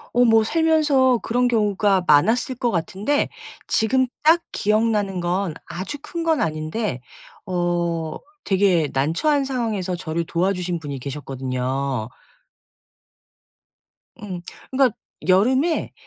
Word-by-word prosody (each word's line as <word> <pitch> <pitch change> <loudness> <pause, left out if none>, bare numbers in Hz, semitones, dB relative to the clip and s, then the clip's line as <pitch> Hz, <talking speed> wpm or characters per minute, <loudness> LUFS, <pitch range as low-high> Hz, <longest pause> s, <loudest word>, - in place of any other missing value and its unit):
어 245 - +5
뭐 225 -1 +5
살면서 295 -3 +3
그런 245 +2 +1
경우가 205 -4 +2
많았을 220 - +4
것 240 0 0
같은데 195 - -1 0.4
지금 260 +4 +2 0.2
딱 325 +3 +5
기억나는 210 -3 +1
건 175 0 -1
아주 190 +11 -5
큰 340 -1 -5
건 325 -3 +2
아닌데 155 - -2 0.5
어 175 -3 -1 0.3
되게 185 -6 +2
난처한 170 - +1
상황에서 225 -9 -2
저를 170 0 -3
도와주신 180 0 -1
분이 145 -3 -6
계셨거든요. 130 -2 -3 2.1
음. 185 -4 -6 0.3
그러니까 260 -4 +3 0.3
여름에 260 - +2
195 Hz, 235 characters per minute, -22 LUFS, 165-245 Hz, 2.1 s, 어